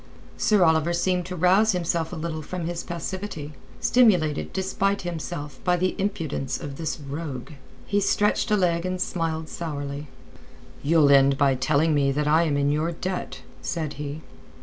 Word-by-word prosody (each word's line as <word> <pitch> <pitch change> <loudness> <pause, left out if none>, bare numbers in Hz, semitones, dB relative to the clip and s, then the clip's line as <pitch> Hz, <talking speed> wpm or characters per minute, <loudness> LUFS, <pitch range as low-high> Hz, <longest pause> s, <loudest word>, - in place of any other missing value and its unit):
Sir 210 -4 +3
Oliver 160 0 +3
seemed 180 +1 0
to 185 - -5
rouse 190 +5 +4
himself 170 -2 -1
a - - -5
little 160 -1 -4
from 175 +3 -5
his 175 0 -3
passivity, 170 -3 -5 0.3
stimulated 180 -12 +3
despite 195 +1 0
himself 160 -4 -5
by 180 -1 +2
the 185 +1 +1
impudence 165 -9 -2
of 140 -4 -7
this 160 -2 -3
rogue. 140 -1 -6 0.3
He 205 - +1
stretched 210 +3 +1
a 210 - +3
leg 170 -3 +1
and 185 0 -2
smiled 165 -3 -2
sourly. 145 -3 -5 0.7
"You'll 150 -1 +4
end 135 0 +5
by 140 -1 +4
telling 150 +4 +2
me 140 -2 +2
that 150 +1 0
I 160 +3 +4
am 145 -3 +1
in 140 0 +2
your 155 +3 0
debt," 180 +2 -4 0.2
said 155 -4 -3
he. 150 +2 -5
165 Hz, 165 wpm, -25 LUFS, 145-180 Hz, 0.7 s, end